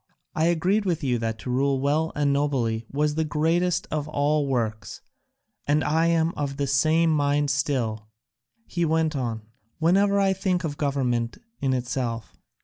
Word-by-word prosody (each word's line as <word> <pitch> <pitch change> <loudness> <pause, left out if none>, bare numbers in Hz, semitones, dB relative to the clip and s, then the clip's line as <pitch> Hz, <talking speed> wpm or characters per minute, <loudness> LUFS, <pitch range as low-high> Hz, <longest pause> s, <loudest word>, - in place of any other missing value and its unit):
I 160 - +1
agreed 180 +5 +2
with 170 -5 -1
you 125 -3 +1
that 115 -1 -2
to 125 - -4
rule 135 +1 +1
well 150 +4 +1
and 145 -1 +2
nobly 120 -6 0
was 150 +1 +1
the 160 +1 0
greatest 165 +4 +1
of 150 -1 -2
all 150 -1 +1
works, 110 -6 -2 0.7
and 150 +2 +2
I 160 +2 +2
am 165 0 +2
of 140 -1 -3
the 140 - 0
same 155 +4 +3
mind 145 -1 +1
still," 120 -8 -1 0.6
he 175 - -2
went 160 -1 +1
on, 115 -5 -3 0.3
"whenever 200 +5 +3
I 195 -1 +3
think 185 -2 -1
of 150 -3 -3
government 125 -5 -1 0.2
in 135 -1 0
itself. 120 -2 -3
145 Hz, 160 wpm, -25 LUFS, 130-160 Hz, 0.7 s, same